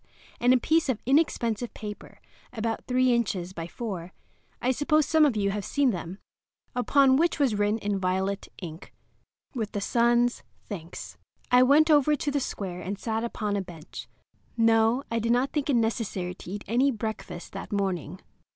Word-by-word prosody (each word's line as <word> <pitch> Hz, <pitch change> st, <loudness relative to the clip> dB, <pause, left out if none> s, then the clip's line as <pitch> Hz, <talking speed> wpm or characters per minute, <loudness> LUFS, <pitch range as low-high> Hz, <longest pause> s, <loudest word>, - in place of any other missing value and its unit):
and 245 Hz, +1 st, +4 dB
a 255 Hz, -, +6 dB
piece 320 Hz, +2 st, +2 dB
of 240 Hz, -4 st, 0 dB
inexpensive 245 Hz, -5 st, +1 dB
paper, 210 Hz, -1 st, -8 dB, 0.3 s
about 225 Hz, -1 st, -2 dB
3 255 Hz, 0 st, +3 dB
inches 190 Hz, -6 st, -1 dB
by 165 Hz, -2 st, -5 dB
4—I 195 Hz, +4 st, -6 dB
suppose 300 Hz, +3 st, +2 dB
some 315 Hz, +2 st, +4 dB
of 255 Hz, -, -1 dB
you 200 Hz, -1 st, +1 dB
have 205 Hz, 0 st, -3 dB
seen 280 Hz, +2 st, +2 dB
them—upon 250 Hz, -, 0 dB
which 335 Hz, +3 st, +2 dB
was 275 Hz, -7 st, +2 dB
written 205 Hz, +1 st, +1 dB
in 205 Hz, -2 st, -2 dB
violet 190 Hz, +2 st, -1 dB, 0.2 s
ink, 165 Hz, 0 st, -9 dB, 0.6 s
"With 220 Hz, -5 st, -3 dB
the 205 Hz, -, -1 dB
Sun's 240 Hz, +3 st, +2 dB, 0.2 s
thanks." 175 Hz, -5 st, -8 dB, 0.3 s
I 250 Hz, 0 st, +7 dB
went 295 Hz, +5 st, +5 dB
over 300 Hz, 0 st, +5 dB
to 290 Hz, +1 st, -2 dB
the 285 Hz, -, +1 dB
square 185 Hz, -8 st, -4 dB
and 195 Hz, +3 st, -4 dB
sat 225 Hz, +2 st, -2 dB
upon 215 Hz, -3 st, -2 dB
a 200 Hz, -, 0 dB
bench. 170 Hz, -4 st, -9 dB, 0.5 s
No; 225 Hz, +3 st, +3 dB
I 230 Hz, -, +1 dB
did 230 Hz, +1 st, 0 dB
not 255 Hz, +3 st, +1 dB
think 295 Hz, -1 st, -2 dB
it 275 Hz, -, +3 dB
necessary 220 Hz, -6 st, -1 dB
to 180 Hz, -, -12 dB
eat 205 Hz, +2 st, -5 dB
any 250 Hz, +5 st, +3 dB
breakfast 220 Hz, -7 st, -5 dB
that -, -, -7 dB
morning. 185 Hz, -4 st, -2 dB
225 Hz, 170 wpm, -27 LUFS, 195-255 Hz, 0.6 s, I